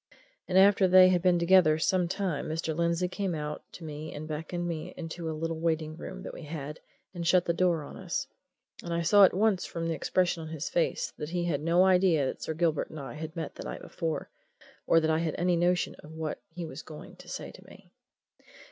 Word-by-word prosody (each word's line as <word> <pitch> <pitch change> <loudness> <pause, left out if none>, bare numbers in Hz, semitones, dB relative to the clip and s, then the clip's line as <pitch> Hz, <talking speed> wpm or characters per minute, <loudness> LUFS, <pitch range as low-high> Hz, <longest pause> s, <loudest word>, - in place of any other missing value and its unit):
And 185 - +1
after 195 0 +6
they 185 0 +8
had 180 -1 +2
been 180 -1 +4
together 170 -3 +5
some 180 +2 +1
time 185 -5 -2
Mr. 160 0 -2
Lindsey 170 +2 +1
came 185 -1 -2
out 150 0 -4
to 175 - -10
me 155 0 -6
and 150 +1 -6
beckoned 165 +3 -4
me 160 -2 -5
into 165 0 -5
a 155 - -4
little 165 0 -3
waiting 160 -1 -1
room 190 +3 -8
that - - -7
we - - -9
had 150 -1 -6 0.3
and 170 -2 -4
shut 180 +1 +4
the 170 - +1
door 170 -3 +1
on - - -10
us, - - -3 0.6
and 170 - -6
I 170 - 0
saw 200 +4 +7
at - - +2
once 205 -1 +2
from 165 -1 -4
the 165 - 0
expression 175 +2 0
on 160 - -7
his 160 0 -4
face 170 - 0
that 150 -1 -5
he 175 0 -1
had 155 -5 -1
no 170 +4 +4
idea 180 -6 +4
that - - -4
Sir 160 - -3
Gilbert 160 -2 0
and 155 - -8
I 135 -4 -7
had 160 +2 -7
met 165 -2 -4
the - - -8
night - - -6
before, 165 -3 -4 0.6
or 165 - +6
that 160 0 +1
I 160 - +2
had 165 -2 -1
any 175 0 +2
notion 175 +1 +1
of 150 - -12
what 160 -1 -4
he 170 +1 -6
was 155 -2 -7
going 150 0 -11
to - - -14
say - - -6
to - - -15
me. - - -16
165 Hz, 230 wpm, -29 LUFS, 155-180 Hz, 0.6 s, they